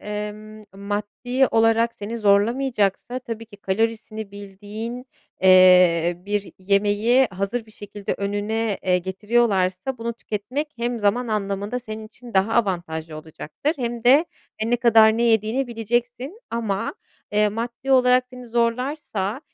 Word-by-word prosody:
emm, 210 +1 -6
maddi 210 +6 -1
olarak 225 +1 +3
seni 220 +3 -6
zorlamayacaksa 215 +2 +1
tabii 230 -3 -7
ki 205 - -15
kalorisini 215 +1 -2
bildiğin, 205 +5 -7 0.4
eee, 180 -2 +6
bir 205 -1 -2
yemeği 205 +6 +3
hazır 200 +5 -3
bir - - -17
şekilde 205 -1 -6
önüne, 205 +2 -1
eee, 180 -1 +2
getiriyorlarsa 195 +2 0
bunu 235 +1 -3
tüketmek 235 +7 -4
hem 240 0 -2
zaman 225 +4 +1
anlamında 205 +2 -2
senin 220 -2 -8
için 235 0 -14
daha 195 +4 +2
avantajlı 170 -7 -1
olacaktır 160 - -4
hem 240 -2 -4
de 280 +7 +6 0.3
e, 220 +2 -2
ne 240 - +3
kadar 225 -2 +5
ne 235 - 0
yediğini 230 +3 +2
bileceksin. 240 - -3
Ama, 220 -4 -2 0.4
eee, 210 0 +3
maddi 235 +5 -5
olarak 250 -1 +5
seni 250 -1 -10
zorlarsa, 235 -1 -1
220 Hz, 130 wpm, -23 LUFS, 200-240 Hz, 0.4 s, eee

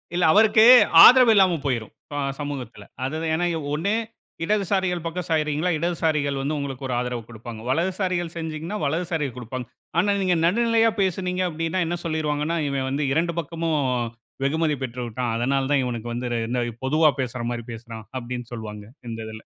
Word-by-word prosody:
இல்ல, 180 - +1
அவருக்கு 220 +1 +6 0.4
ஆதரவு 250 -2 +8
இல்லாம 185 -4 +4
போயிரும், 120 -6 -2
இப்ப - - -14
ஆ - - -1 0.2
சமூகத்தில. 130 -8 -6 0.2
அது 155 +4 -3 0.2
ஏன்னா, 175 +2 +1 0.3
ஒண்ணு, 190 +8 0 0.5
இடதுசாரிகள் 190 -3 0
பக்கம் 175 +1 -4
சாயிறீங்களா? 155 +2 +1
இடதுசாரிகள் 155 -4 0
வந்து 150 +3 -1
உங்களுக்கு 135 -2 -5
ஒரு 125 - -2
ஆதரவு 125 -2 -3
கொடுப்பாங்க. 115 -1 -9
வலதுசாரிகள் 175 +2 -1
சாஞ்சீங்கன்னா, 160 +4 -4
வலதுசாரிகள் 160 -4 -2
கொடுப்பாங்க. 125 0 -6 0.3
ஆனா, 205 +3 +2
நீங்க 180 -2 +2
நடுநிலையா 230 +3 +3
பேசுனீங்க. 185 0 -1
அப்பிடீன்னா, 165 +3 -2
என்ன 175 +1 -2
சொல்லிருவாங்கன்னா, 155 0 -1
இவன் 135 -1 -2
வந்து, 140 +2 -1
இரண்டு 170 +2 0
பக்கமும் 165 0 -2 0.7
வெகுமதி 155 +1 +1
பெற்று 125 0 -5
விட்டான். 120 0 -3
அதனால 135 +3 0
தான் 140 -2 +3
இவனுக்கு 120 -2 -4
வந்து 125 +1 -3
ரெ - - 0
இந்த 125 0 0 0.2
பொதுவா 155 +3 +4
பேசுற 125 -1 -4
மாரி 120 -1 -4
பேசுறான். 115 -1 -9
அப்பிடீன்னு 120 0 -6
சொல்லுவாங்க, 105 -2 -7 0.2
இந்த 115 -1 -5
இதில. 110 0 -9
150 Hz, 160 wpm, -24 LUFS, 125-175 Hz, 0.7 s, ஆதரவு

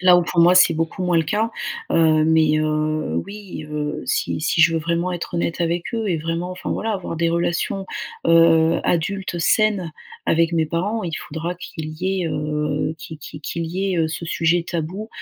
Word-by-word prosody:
Là 180 -1 +7
où, 175 - +3
pour 170 - +1
moi, 175 +2 +6
c'est 180 -2 +6
beaucoup 165 +3 -2
moins 180 -1 +2
le 165 - +4
cas. 215 +7 0 0.4
Heu, 155 -2 +4
mais, 155 -1 +4
heu, 155 - 0
oui, 200 -6 -8
heu, 150 0 -3
si - - -1
si 165 +1 +1
je 165 +1 +6
veux 165 - 0
vraiment 170 +3 -1
être 175 0 -5
honnête 170 0 -1
avec 170 +1 0
eux 225 -2 -1
et 175 - +1
vraiment, 165 +3 -3
enfin 185 +1 -5
voilà, 225 - -2
avoir 185 -4 -4
des 165 +1 +1
relations, 170 +3 -1 0.4
heu, 165 -1 +5
adultes, 180 +1 -1
saines 195 -1 +2 0.3
avec 165 +1 +3
mes 160 -1 +2
parents, 190 +7 -2
il 165 -2 -3
faudra 165 +3 -5
qu'il 160 -3 -7
y 190 -1 0
ait - - -1
heu, 150 0 -1
qui 160 +2 -8
qui 150 - -10
qu'il 165 +2 -4
y 190 +3 -1
ait 165 -2 +1
ce 165 +1 -5
sujet 170 +1 +1
tabou, 175 +5 -4
170 Hz, 195 wpm, -21 LUFS, 160-180 Hz, 0.4 s, Là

